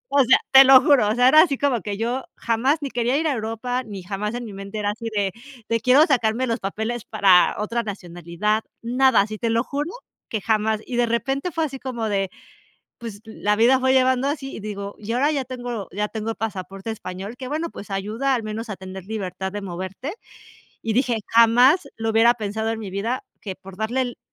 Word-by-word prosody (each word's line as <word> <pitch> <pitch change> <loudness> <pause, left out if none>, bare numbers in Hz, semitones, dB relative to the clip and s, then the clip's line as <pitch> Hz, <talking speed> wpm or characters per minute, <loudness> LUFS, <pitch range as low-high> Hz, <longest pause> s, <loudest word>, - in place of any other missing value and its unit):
O 280 - +6
sea, 250 - +6
te 270 0 +10
lo 265 -1 +9
juro. 270 -8 +4
O 215 - +1
sea, 250 +1 +5
era 310 +3 +8
así 300 -5 +2
como 260 -6 +1
que 205 0 -4
yo 240 +4 -2
jamás, 255 +7 +1
ni 280 - -2
quería 245 +3 +1
ir 320 - 0
a 295 - +1
Europa, 230 +2 -3
ni 200 -5 -8
jamás 210 +4 -3
en 245 - -5
mi 215 - -8
mente 195 +2 -7
era 205 0 0
así 230 +2 -9
de, 200 -2 +1 0.4
de 230 0 +1
quiero 265 +6 +6
sacarme 240 -2 +1
los 230 -1 -1
papeles 220 +4 -3
para 185 -3 +4
otra 230 +3 -1
nacionalidad. 185 +1 -2 0.2
Nada, 250 -1 +4
así, 215 +1 -4
te 230 - -1
lo 230 +1 +2
juro 290 +4 -3 0.4
que 220 - -2
jamás. 220 0 +1
Y 245 - -4
de 240 -1 +2
repente 270 - -1
fue 325 +1 -1
así 270 -3 -6
como 235 -4 -3
de 195 -2 0 0.7
pues, 225 -4 -8
la 210 -1 -1
vida 245 +4 +5
fue 260 0 +3
llevando 260 0 +3
así 280 -2 -4
y - - -7
digo 200 -1 -6
y 205 - -12
yo 230 - 0
ahora 285 +4 +3
ya 275 -3 -1
tengo 245 -5 -5
ya 210 +2 -2
tengo 220 0 -4
el - - -4
pasaporte 195 -1 -5
español 200 +1 -7
que 260 - -7
bueno, 320 +3 -2
pues, 205 - -10
ayuda 215 +8 -1
al 235 - -1
menos 220 +2 -5
a 210 - -3
tener 190 0 -9
libertad 190 -3 -4
de 205 0 -5
moverte. 190 - -6 0.7
Y 225 - -1
dije: 245 -2 +1
"Jamás 245 +9 +5
lo 225 0 -1
hubiera 230 +2 +5
pensado 220 0 -3
en 225 0 -3
mi 200 - -6
vida 220 +7 -2 0.2
que 195 -3 -6
por 190 0 -13
darle 220 +5 -1
el 245 -2 -5
225 Hz, 220 wpm, -23 LUFS, 205-255 Hz, 0.7 s, te